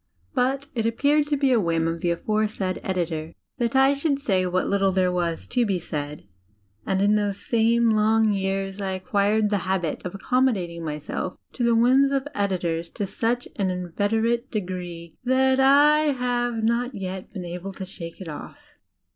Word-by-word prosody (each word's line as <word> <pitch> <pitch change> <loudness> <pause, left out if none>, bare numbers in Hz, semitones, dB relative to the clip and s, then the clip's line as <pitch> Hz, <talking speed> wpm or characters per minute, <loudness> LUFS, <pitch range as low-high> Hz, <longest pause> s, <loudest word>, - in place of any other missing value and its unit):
But 265 +2 0
it 225 -2 0
appeared 290 +6 +2
to 295 -1 +1
be 275 -1 +2
a 235 - +4
whim 165 -3 +1
of 165 0 -3
the 175 - +1
aforesaid 210 +1 -1
editor 165 -4 -3 0.2
that 235 +1 0
I 270 +1 +5
should 280 0 0
say 190 -9 +1
what 185 +1 0
Utde 195 -1 +1
there 185 -1 +3
was 170 -2 -2
to 245 -1 +2
be 200 -5 0
said; 150 - -5 0.6
and 190 0 +1
in 205 +1 +4
those 205 -2 -1
same 230 0 +3
long 220 0 +3
years 195 0 -2
I 190 -1 -2
acquired 205 +1 +1
the 205 - +2
habit 185 -3 -2
of 180 - -5
accommodadng 200 -6 0
myself 150 +3 -4 0.2
to 245 - -3
the 235 -1 +4
whims 260 +4 +5
of 275 0 -1
editors 175 -6 -1
to 205 - -2
such 235 +5 -1
an 195 -2 +1
inveterate 215 +7 -1
degree 180 -5 -5
that 260 +1 +3
1 290 +2 +5
have 245 -2 -1
not 240 +2 0
yet 190 -1 -5
been 185 -4 -6
able 180 +3 -6
to 190 - -6
shake 170 -3 -9
it 190 - -8
off. 150 -2 -8
205 Hz, 175 wpm, -24 LUFS, 180-245 Hz, 0.6 s, I